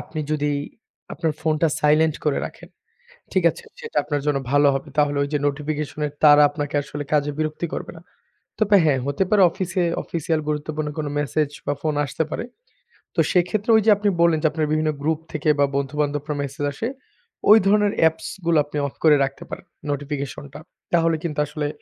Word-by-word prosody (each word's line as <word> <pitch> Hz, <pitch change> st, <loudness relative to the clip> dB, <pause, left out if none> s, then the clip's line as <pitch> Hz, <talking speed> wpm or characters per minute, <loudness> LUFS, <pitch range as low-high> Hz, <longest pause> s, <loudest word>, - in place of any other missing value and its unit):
আপনি 155 Hz, -, -6 dB
যদি 150 Hz, -1 st, 0 dB, 0.6 s
আপনার 165 Hz, -2 st, -1 dB
ফোনটা 160 Hz, 0 st, +1 dB
সাইলেন্ট 155 Hz, +1 st, +3 dB
করে 150 Hz, -, +1 dB
রাখেন, -, -, -13 dB, 0.6 s
ঠিক -, -, +1 dB
আছে? 480 Hz, -, -12 dB, 0.2 s
সেটা 460 Hz, 0 st, -9 dB
আপনার 145 Hz, -1 st, -2 dB
জন্য 145 Hz, -2 st, +2 dB
ভালো 145 Hz, 0 st, +5 dB
হবে। 135 Hz, +3 st, -4 dB
তাহলে 145 Hz, -1 st, +2 dB
ওই 140 Hz, -, -2 dB
যে, 150 Hz, -, +2 dB
নোটিফিকেশনে 150 Hz, +1 st, -2 dB, 0.2 s
তারা 150 Hz, 0 st, +8 dB
আপনাকে 145 Hz, 0 st, -5 dB
আসলে 145 Hz, +1 st, -6 dB
কাজে 145 Hz, -1 st, +2 dB
বিরক্তি 155 Hz, +2 st, -2 dB
করবে -, -, -5 dB
না। 165 Hz, -, -13 dB, 0.6 s
তবে 210 Hz, -2 st, +4 dB
হ্যাঁ, 140 Hz, -4 st, +2 dB
হতে 140 Hz, +7 st, 0 dB
পারে 205 Hz, -2 st, +5 dB
অফিসে 185 Hz, +1 st, -2 dB, 0.2 s
অফিসিয়াল 160 Hz, -1 st, -1 dB
গুরুত্বপূর্ণ 150 Hz, 0 st, -2 dB
কোনো 150 Hz, -2 st, -2 dB
মেসেজ 145 Hz, +1 st, 0 dB, 0.2 s
বা 145 Hz, -, 0 dB
ফোন 155 Hz, -1 st, 0 dB
আসতে 160 Hz, +3 st, -2 dB
পারে। -, -, -3 dB, 0.7 s
তো -, -, -1 dB
সেক্ষেত্রে 195 Hz, +5 st, +1 dB
ওই 220 Hz, -, +5 dB
যে, -, -, +5 dB
আপনি 205 Hz, 0 st, +1 dB
বললেন 165 Hz, -2 st, +4 dB
যে, -, -, +5 dB
আপনার 155 Hz, -1 st, -1 dB
বিভিন্ন 155 Hz, 0 st, +1 dB
গ্রুপ 155 Hz, +1 st, 0 dB
থেকে 155 Hz, 0 st, -1 dB
বা 140 Hz, -, +5 dB
বন্ধুবান্ধবরা 145 Hz, +1 st, -1 dB
মেসেজ 140 Hz, +1 st, -5 dB
আসে, 225 Hz, +11 st, -3 dB, 0.6 s
ওই 215 Hz, -, +10 dB
ধরনের 205 Hz, 0 st, +3 dB
অ্যাপস 160 Hz, 0 st, +2 dB, 0.2 s
গুলো 170 Hz, -1 st, +3 dB
আপনি 150 Hz, 0 st, -6 dB
অফ -, -, -10 dB
করে 155 Hz, -2 st, +7 dB
রাখতে 135 Hz, 0 st, -4 dB
পারেন, -, -, -8 dB, 0.3 s
নোটিফিকেশন 140 Hz, -1 st, -4 dB
টা। 150 Hz, -, -8 dB, 0.3 s
তাহলে 165 Hz, -1 st, +3 dB
কিন্তু 150 Hz, -3 st, -3 dB
আসলে 150 Hz, 0 st, -3 dB
150 Hz, 185 wpm, -22 LUFS, 145-165 Hz, 0.7 s, ওই